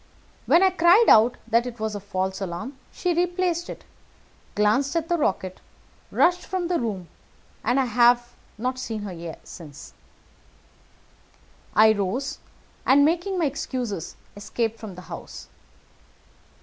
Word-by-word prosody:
When 345 Hz, -, +5 dB
I 380 Hz, -, +5 dB
cried 365 Hz, +6 st, +5 dB
out 230 Hz, +3 st, +6 dB
that 235 Hz, +1 st, +2 dB
it 240 Hz, -2 st, -8 dB
was 220 Hz, 0 st, -2 dB
a 205 Hz, -, -4 dB
false 190 Hz, -1 st, -3 dB
alarm, 190 Hz, +9 st, -5 dB, 0.2 s
she 360 Hz, -2 st, -1 dB
replaced 350 Hz, 0 st, 0 dB
it, -, -, -8 dB, 0.7 s
glanced 220 Hz, +8 st, +2 dB
at 330 Hz, -1 st, -1 dB
the 345 Hz, -, +3 dB
rocket, 190 Hz, -7 st, -1 dB, 0.5 s
rushed 360 Hz, +1 st, +3 dB
from 370 Hz, -2 st, -2 dB
the 350 Hz, -, +1 dB
room, 200 Hz, -7 st, -3 dB, 0.6 s
and 245 Hz, +5 st, +2 dB
I 265 Hz, -, +2 dB
have 240 Hz, 0 st, +3 dB, 0.2 s
not 255 Hz, +3 st, -2 dB
seen 225 Hz, -4 st, -4 dB
her 170 Hz, -4 st, -6 dB
since. 150 Hz, -5 st, -11 dB, 1.8 s
I 220 Hz, 0 st, +7 dB
rose, 205 Hz, +7 st, -2 dB, 0.4 s
and, 280 Hz, +2 st, +5 dB
making 350 Hz, +4 st, 0 dB
my 340 Hz, -, +1 dB
excuses, 250 Hz, -, -4 dB, 0.2 s
escaped 225 Hz, +2 st, -3 dB
from 215 Hz, -5 st, -8 dB
the 180 Hz, -, -9 dB
house. -, -, -9 dB
240 Hz, 135 wpm, -24 LUFS, 205-330 Hz, 1.8 s, I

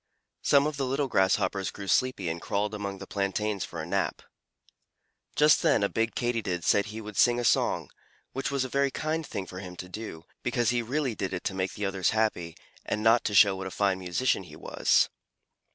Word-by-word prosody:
Some 140 Hz, 0 st, +4 dB
of 150 Hz, -1 st, -2 dB
the 135 Hz, -, 0 dB
little 135 Hz, +2 st, 0 dB
Grasshoppers 95 Hz, -2 st, +1 dB
grew 100 Hz, -1 st, -8 dB
sleepy 130 Hz, -5 st, +1 dB
and 85 Hz, +1 st, -3 dB
crawled 105 Hz, +1 st, -1 dB
among 100 Hz, -2 st, -4 dB
the -, -, -8 dB
plantains 100 Hz, 0 st, -1 dB
for -, -, -7 dB
a -, -, -4 dB
nap. -, -, -1 dB, 1.1 s
Just 150 Hz, 0 st, +5 dB
then 105 Hz, -, +3 dB
a 100 Hz, -, +2 dB
big 115 Hz, 0 st, -1 dB
Katydid 115 Hz, -8 st, -1 dB
said 100 Hz, +5 st, +3 dB
he 110 Hz, +1 st, -6 dB
would 105 Hz, -1 st, -9 dB
sing 120 Hz, +3 st, +4 dB
a -, -, -1 dB
song -, -, +2 dB, 0.4 s
which 135 Hz, +1 st, -2 dB
was 140 Hz, -2 st, 0 dB
a -, -, -3 dB
very 140 Hz, +2 st, +1 dB
kind 155 Hz, +4 st, -2 dB
thing 100 Hz, -9 st, -5 dB
for 90 Hz, 0 st, -8 dB
him 90 Hz, -2 st, -8 dB
to 90 Hz, -, -8 dB
do, 90 Hz, -4 st, -7 dB, 0.2 s
because 120 Hz, -1 st, +1 dB
he 120 Hz, -1 st, +1 dB
really 130 Hz, +2 st, -1 dB
did 95 Hz, -2 st, -3 dB
it 90 Hz, -, -5 dB
to -, -, -2 dB
make 95 Hz, 0 st, -2 dB
the 105 Hz, -, -3 dB
others 95 Hz, -2 st, +1 dB
happy, 90 Hz, -7 st, 0 dB, 0.3 s
and 105 Hz, -, -2 dB
not 115 Hz, +1 st, +5 dB
to 105 Hz, -, -1 dB
show 100 Hz, 0 st, +7 dB
what 95 Hz, 0 st, -5 dB
a -, -, -4 dB
fine 95 Hz, 0 st, 0 dB
musician 95 Hz, +8 st, 0 dB
he -, -, -12 dB
was. -, -, +2 dB
105 Hz, 215 wpm, -28 LUFS, 95-125 Hz, 1.1 s, show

